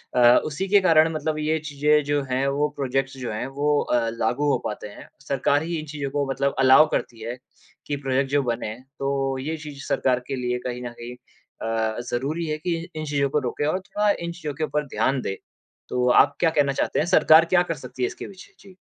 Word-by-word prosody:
अ, -, -, +3 dB, 0.3 s
उसी 155 Hz, +6 st, -3 dB
के 200 Hz, +1 st, +5 dB
कारण 160 Hz, -3 st, +5 dB
मतलब 155 Hz, 0 st, -2 dB
ये 155 Hz, +1 st, +1 dB
चीज़ें 150 Hz, 0 st, +2 dB
जो 145 Hz, 0 st, 0 dB
हैं, 130 Hz, +2 st, +1 dB
वो 145 Hz, +2 st, +1 dB
प्रोजेक्ट्स 135 Hz, 0 st, -2 dB
जो 125 Hz, -3 st, -4 dB
हैं 110 Hz, -, -3 dB
वो 145 Hz, +2 st, +1 dB
अ, 115 Hz, -2 st, 0 dB
लागू 120 Hz, +5 st, 0 dB
हो -, -, +2 dB
पाते 105 Hz, 0 st, -4 dB
हैं। 100 Hz, -, -12 dB, 0.2 s
सरकार 140 Hz, +2 st, +1 dB
ही 170 Hz, +1 st, -3 dB
इन 155 Hz, -, -7 dB
चीज़ों 145 Hz, -2 st, -5 dB
को 145 Hz, 0 st, 0 dB
मतलब 140 Hz, +1 st, 0 dB
अलाउ 135 Hz, +4 st, +7 dB
करती 115 Hz, -2 st, -3 dB
है 120 Hz, +3 st, -5 dB, 0.5 s
कि 145 Hz, -, -1 dB
प्रोजेक्ट 135 Hz, 0 st, 0 dB
जो 145 Hz, -1 st, +2 dB
बने। 115 Hz, -3 st, -3 dB, 0.2 s
तो 135 Hz, -1 st, -1 dB
ये 155 Hz, +5 st, -3 dB
चीज़ 150 Hz, -3 st, -9 dB
सरकार 125 Hz, -1 st, +1 dB
के 135 Hz, -, -2 dB
लिए 125 Hz, -1 st, -1 dB
कहीं 125 Hz, 0 st, -4 dB
न 120 Hz, -, -4 dB
कहीं 120 Hz, +1 st, -7 dB, 0.5 s
अ, 110 Hz, 0 st, -1 dB
ज़रूरी 145 Hz, +7 st, -2 dB
है 155 Hz, -1 st, -2 dB
कि 170 Hz, +2 st, -2 dB
इ 165 Hz, +1 st, -7 dB
इन 155 Hz, -, -4 dB
चीज़ों 140 Hz, -2 st, 0 dB
को 150 Hz, -, +1 dB
रोके 140 Hz, +2 st, -2 dB
और 170 Hz, +5 st, 0 dB
थोड़ा 205 Hz, +2 st, -1 dB, 0.2 s
इन 170 Hz, -, -3 dB
चीज़ों 160 Hz, -4 st, -6 dB
के 160 Hz, -, -4 dB
ऊपर 150 Hz, -1 st, -1 dB
ध्यान 130 Hz, 0 st, 0 dB
दे। 95 Hz, -, -4 dB, 0.5 s
तो 125 Hz, 0 st, 0 dB
आप -, -, +5 dB
क्या 165 Hz, -, +4 dB
कहना 145 Hz, -3 st, +2 dB
चाहते -, -, -1 dB
हैं? 155 Hz, -, +1 dB
सरकार 160 Hz, -2 st, +6 dB
क्या 175 Hz, +1 st, +3 dB
कर -, -, -1 dB
सकती 130 Hz, -3 st, -7 dB
है -, -, +3 dB
इसके -, -, -8 dB
पीछे? 195 Hz, -2 st, -14 dB
जी। 195 Hz, -2 st, -16 dB
140 Hz, 230 wpm, -24 LUFS, 130-155 Hz, 0.5 s, अलाउ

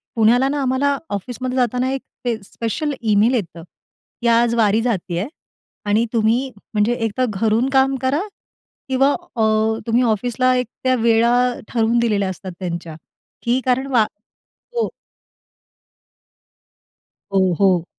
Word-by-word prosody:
पुण्याला 235 Hz, +4 st, +4 dB
ना, 290 Hz, 0 st, -1 dB
आम्हाला 275 Hz, +2 st, +1 dB
ऑफिसमध्ये 250 Hz, +6 st, -4 dB
जाताना, 250 Hz, +1 st, +1 dB
एक 270 Hz, -, -2 dB, 0.2 s
ते 235 Hz, -2 st, +1 dB
स्पेशल 235 Hz, +9 st, -3 dB
ईमेल 215 Hz, +2 st, +3 dB
येतं 170 Hz, -7 st, -3 dB, 0.6 s
की 235 Hz, -, 0 dB
"आज, 235 Hz, 0 st, +4 dB
वारी 220 Hz, -1 st, +3 dB
जातीये 195 Hz, -4 st, -2 dB, 0.6 s
आणि 215 Hz, +3 st, +2 dB
तुम्ही 230 Hz, +4 st, +2 dB, 0.2 s
म्हणजे, 210 Hz, +3 st, +2 dB
एक 225 Hz, -3 st, -2 dB
तर 255 Hz, -, +3 dB
घरून 220 Hz, +5 st, +1 dB
काम 270 Hz, 0 st, +4 dB
करा." 270 Hz, +6 st, +1 dB, 0.7 s
किंवा 270 Hz, +2 st, +3 dB
अ, 350 Hz, -11 st, -4 dB, 0.4 s
तुम्ही 235 Hz, +2 st, +3 dB
ऑफिसला, 245 Hz, +3 st, +1 dB
एक 250 Hz, -2 st, 0 dB, 0.2 s
त्या 255 Hz, 0 st, +3 dB
वेळा 230 Hz, 0 st, +3 dB, 0.3 s
ठरवून 230 Hz, 0 st, +1 dB
दिलेल्या 205 Hz, -5 st, +1 dB
असतात, 185 Hz, 0 st, -7 dB
त्यांच्या 170 Hz, -3 st, -5 dB, 0.5 s
की 240 Hz, +2 st, +2 dB
कारण 260 Hz, +2 st, +1 dB
वा 235 Hz, -4 st, +5 dB, 0.7 s
हो. 465 Hz, -, +1 dB, 2.5 s
हो, 190 Hz, -2 st, +3 dB
हो. 185 Hz, -4 st, +3 dB
235 Hz, 130 wpm, -20 LUFS, 210-255 Hz, 2.5 s, वा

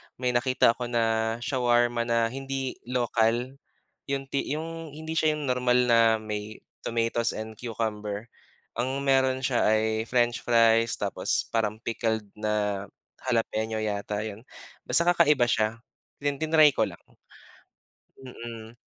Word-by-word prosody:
may 125 Hz, 0 st, -1 dB
nakita 125 Hz, -1 st, +3 dB
ako 120 Hz, +1 st, -5 dB
na 115 Hz, -1 st, +1 dB
shawarma 120 Hz, -2 st, +1 dB
na 115 Hz, -1 st, +1 dB
hindi 135 Hz, 0 st, -4 dB
lokal 120 Hz, +1 st, 0 dB, 0.5 s
yung 140 Hz, -1 st, -2 dB
ti 140 Hz, -, -1 dB
yung 165 Hz, +1 st, -6 dB
hindi 160 Hz, +1 st, -7 dB
siya 155 Hz, -1 st, +2 dB
yung 150 Hz, -, -5 dB
normal 125 Hz, 0 st, +2 dB
na 115 Hz, -2 st, +5 dB
may 110 Hz, -1 st, -6 dB, 0.2 s
tomatoes 115 Hz, 0 st, -1 dB
and 110 Hz, 0 st, -7 dB
cucumber. 110 Hz, -2 st, -4 dB, 0.5 s
Ang 130 Hz, +3 st, -1 dB
meron 130 Hz, -1 st, +2 dB
siya 125 Hz, -2 st, +2 dB
ay 110 Hz, +1 st, 0 dB
french 120 Hz, -1 st, +1 dB
fries 115 Hz, -1 st, +3 dB
tapos -, -, -1 dB
parang 110 Hz, -2 st, 0 dB
pickled 110 Hz, -1 st, -1 dB, 0.2 s
na 105 Hz, -2 st, -1 dB, 0.3 s
jalapeno 110 Hz, -2 st, -1 dB
yata 105 Hz, 0 st, -2 dB
yun, 110 Hz, +3 st, -8 dB, 0.4 s
basta 170 Hz, -, +6 dB
kakaiba 150 Hz, -7 st, +4 dB
siya 110 Hz, -2 st, +1 dB, 0.5 s
tin 145 Hz, -1 st, -1 dB
tinry 155 Hz, -1 st, +5 dB
ko -, -, +1 dB
lang. -, -, -10 dB, 1.3 s
Mm, 115 Hz, -2 st, -9 dB
120 Hz, 130 wpm, -27 LUFS, 110-130 Hz, 1.3 s, basta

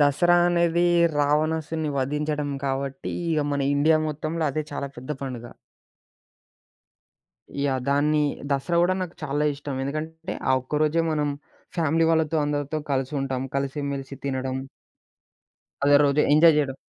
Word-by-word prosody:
దసరా 150 Hz, +5 st, +4 dB
అనేది 170 Hz, 0 st, +2 dB, 0.3 s
రావణాసుని 155 Hz, +1 st, 0 dB
వధించడం 150 Hz, +2 st, -1 dB
కావట్టి 135 Hz, 0 st, -3 dB, 0.2 s
ఇగ 155 Hz, -2 st, +2 dB
మన 140 Hz, -1 st, 0 dB
ఇండియా 155 Hz, +2 st, +4 dB
మొత్తంలో 155 Hz, +2 st, -3 dB
అదే 155 Hz, +2 st, -2 dB
చాలా 140 Hz, -1 st, -3 dB
పెద్ద 130 Hz, +4 st, -9 dB
పండుగ. 125 Hz, -3 st, -5 dB, 2.1 s
ఇగా 140 Hz, -1 st, +1 dB
దాన్ని 150 Hz, +2 st, +2 dB, 0.3 s
దసరా 140 Hz, +5 st, 0 dB
గూడా 180 Hz, +1 st, +2 dB
నాకు 175 Hz, -2 st, -6 dB
చాలా 145 Hz, +1 st, -1 dB
ఇష్టం. 140 Hz, -1 st, -6 dB
ఎందుకంటే 160 Hz, +3 st, -5 dB, 0.2 s
ఆ -, -, +5 dB
ఒక్క 150 Hz, +4 st, -3 dB
రోజే 155 Hz, +2 st, +2 dB
మనం 150 Hz, -1 st, 0 dB, 0.5 s
ఫ్యామిలీ 165 Hz, +1 st, +2 dB
వాళ్ళతో 160 Hz, -1 st, +2 dB
అందరితో 145 Hz, +1 st, -2 dB
కలిసి 135 Hz, +2 st, -1 dB
ఉంటాం. 130 Hz, -1 st, -2 dB
కలిసి 140 Hz, +1 st, -2 dB
మెలిసి 135 Hz, 0 st, -6 dB
తినడం... 130 Hz, -1 st, -2 dB, 1.3 s
అదే 145 Hz, 0 st, +6 dB
రోజు 140 Hz, +1 st, +3 dB
ఎంజాయ్ 155 Hz, +1 st, +7 dB
జేయడం. 135 Hz, -3 st, 0 dB
150 Hz, 130 wpm, -25 LUFS, 140-155 Hz, 2.1 s, ఎంజాయ్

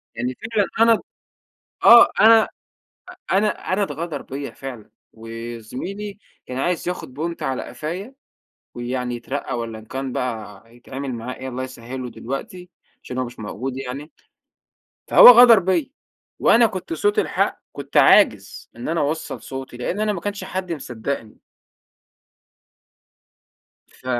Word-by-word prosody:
يعني 125 Hz, +2 st, -2 dB, 0.2 s
فعلًا 205 Hz, -3 st, +2 dB
أنا 230 Hz, 0 st, +6 dB
ب -, -, -6 dB, 0.8 s
آه، 235 Hz, 0 st, +9 dB
أنا 225 Hz, 0 st, +7 dB, 0.8 s
أنا 205 Hz, 0 st, 0 dB
أنا 195 Hz, +2 st, +1 dB
اتغدر 155 Hz, -3 st, -4 dB
بيّا 140 Hz, +1 st, -6 dB
فعلًا، 125 Hz, -5 st, -9 dB, 0.2 s
و 115 Hz, 0 st, -13 dB, 0.3 s
زميلي 195 Hz, -, -7 dB, 0.3 s
كان 125 Hz, -, -5 dB
عايز 175 Hz, +4 st, -1 dB
ياخد 180 Hz, -7 st, -5 dB
بونت 165 Hz, +4 st, -4 dB
على 130 Hz, -1 st, -2 dB
قفايا 185 Hz, -, -6 dB, 0.6 s
ويعني 125 Hz, 0 st, -3 dB
يترقّى 130 Hz, +4 st, -5 dB
والَّا 115 Hz, -1 st, -5 dB
إن 110 Hz, -, -13 dB
كان 135 Hz, +2 st, -5 dB
بقى 110 Hz, -6 st, -5 dB
يتعمِل 135 Hz, +2 st, -6 dB
معاه 120 Hz, +2 st, -6 dB
إيه 130 Hz, -, -7 dB
الله 130 Hz, +1 st, -4 dB
يسهّله 125 Hz, 0 st, -7 dB
دلوقتي، 175 Hz, -, -7 dB, 0.3 s
عشان 125 Hz, -, -7 dB
هو 130 Hz, -, 0 dB
مش 120 Hz, 0 st, -10 dB
موجود 120 Hz, +5 st, -5 dB
يعني، 135 Hz, +3 st, -7 dB, 1.0 s
فهو -, -, +10 dB
غدر 240 Hz, -2 st, +9 dB
بيّا 195 Hz, -, 0 dB, 0.5 s
وأنا 230 Hz, 0 st, +5 dB
كنت 195 Hz, -, -6 dB
صوت 415 Hz, +5 st, 0 dB
الحق، -, -, 0 dB
كنت -, -, -8 dB
عاجز -, -, +4 dB
إن -, -, -6 dB
أنا 165 Hz, 0 st, 0 dB
أوصّل 150 Hz, +3 st, -3 dB
صوتي 135 Hz, -2 st, -8 dB
لأن 150 Hz, +11 st, -3 dB
أنا 215 Hz, 0 st, +1 dB
ماكانش 200 Hz, +2 st, -4 dB
حد 185 Hz, -2 st, -4 dB
مصدّقني. 120 Hz, -5 st, -5 dB, 2.5 s
ف -, -, -24 dB
140 Hz, 135 wpm, -22 LUFS, 125-195 Hz, 2.5 s, فهو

